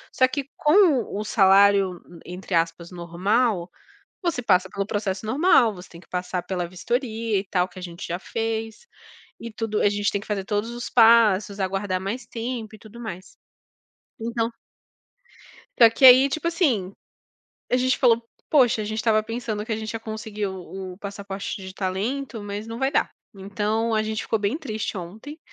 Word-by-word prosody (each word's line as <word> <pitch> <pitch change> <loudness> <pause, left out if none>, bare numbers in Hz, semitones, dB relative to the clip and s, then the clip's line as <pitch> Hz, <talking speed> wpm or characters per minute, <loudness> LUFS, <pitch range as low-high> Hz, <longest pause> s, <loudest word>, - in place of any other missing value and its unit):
Só 255 - +5
que 275 +1 -4
com 305 - +4 0.2
o 210 - -2
salário, 195 -2 +4 0.3
entre 180 +1 -5
aspas, 165 +1 -1
"normal", 180 +3 0 0.5
você 335 -8 -1
passa 190 -3 +3
pelo 195 +1 -3
processo 205 -2 -2
normal, 260 -1 +4
você 180 +1 -11
tem 170 - -13
que - - -23
passar 180 0 -3
pela 180 -2 -3
vistoria 225 +3 -2
e 195 - -6
tal, 180 -1 +1
que 180 - -17
a - - -10
gente 175 -1 -7
já 175 - -2
fez, 225 - -4 0.5
e 230 - -7
tudo 220 -1 -2
a - - +4
gente 205 0 0
tem 200 - -1
que - - -12
fazer 200 -2 -2
todos 210 +3 -2
os 240 0 -6
passos, 225 -4 +5
aguardar 190 0 -1
mais 205 +7 -4
tempo 230 -2 -5
e 215 - -17
tudo 220 +2 -13
mais. 185 -5 -8 0.8
Então 230 0 -1 1.3
só 230 - +9
que 230 +4 +3
aí, 260 +2 +9
tipo 315 +4 -2
assim, 250 - +1 0.8
a - - +3
gente 255 +1 +2
falou: 235 -2 +4 0.3
"Poxa, 245 -7 +4
a - - -4
gente 220 +1 -4
estava 215 -1 +2
pensando 225 -2 -4
que 225 - -4
a - - 0
gente 220 0 -5
ia 225 - -5
conseguir 215 -1 -5
o 190 0 -7
o 180 - -20
passaporte 200 0 -6
de 190 - -8
talento, 215 +6 -3
mas 205 +1 -5
não 230 +1 -6
vai 265 +1 +1
dar.". - - +1 0.2
Então, 210 +3 -1
a 215 - +2
gente 220 0 -3
ficou 225 - -1
bem 205 +9 -1
triste 220 - -4
ontem, 220 - -9
215 Hz, 180 wpm, -24 LUFS, 190-235 Hz, 1.3 s, só